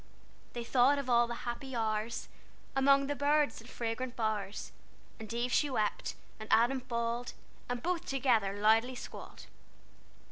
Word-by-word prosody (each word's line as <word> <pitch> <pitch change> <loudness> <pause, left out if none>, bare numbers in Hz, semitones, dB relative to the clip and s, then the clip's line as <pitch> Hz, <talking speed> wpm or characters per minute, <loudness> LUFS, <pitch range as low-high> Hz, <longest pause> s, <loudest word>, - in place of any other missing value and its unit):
They 240 - -4
thought 255 +4 +4
of 270 -3 -2
all 240 0 +5
the 235 +1 -6
happy 250 +2 -4
hours 220 0 -1 0.5
Among 275 +1 +5
the 290 - -1
birds 285 -4 +2
and 230 - -14
fragrant 240 +2 -3
bowers, 215 -3 -2 0.5
And 220 0 -7
Eve 240 +1 -1
she 295 - +3
wept, 215 -5 -1 0.2
and 215 - -8
Adam 240 +4 +4
bawled, 235 0 -3 0.4
And 245 -1 -3
both 350 0 -1
together 230 -7 +1
loudly 225 +4 +4
squalled." - - -9
240 Hz, 145 wpm, -32 LUFS, 225-270 Hz, 0.5 s, all